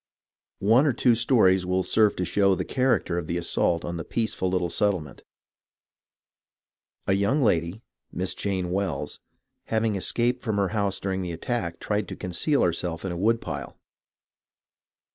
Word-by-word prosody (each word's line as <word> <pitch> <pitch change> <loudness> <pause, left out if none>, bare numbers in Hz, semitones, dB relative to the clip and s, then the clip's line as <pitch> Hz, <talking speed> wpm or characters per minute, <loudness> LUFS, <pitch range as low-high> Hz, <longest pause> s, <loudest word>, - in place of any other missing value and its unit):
One 115 +9 +4
or 140 - +2
two 125 0 +3
stories 110 -6 +4
will 90 +1 0
serve 110 +1 +3
to 90 - -2
show 100 0 +3
the - - -3
character 125 -9 +1
of 80 - -6
the 85 - -1
assault 85 0 0
on 85 0 -4
the 85 - -4
peaceful 110 -5 -1
little 90 -1 0
settlement. 90 -8 -1 1.8
A - - +2
young 100 +9 +2
lady 90 0 0 0.3
(Miss 90 +1 -2
Jane 95 -3 -2
Wells) 95 -6 -2 0.5
having 110 -1 0
escaped 120 +6 0
from 110 -4 -2
her 100 -2 +1
house 100 -2 -1
during 95 -1 -2
the 90 -2 -4
attack, 85 -1 -3
tried 105 0 -1
to - - -6
conceal 95 - 0
herself 85 0 -2
in 95 - -2
a - - -4
woodpile. 115 +6 -1
95 Hz, 155 wpm, -26 LUFS, 90-110 Hz, 1.8 s, One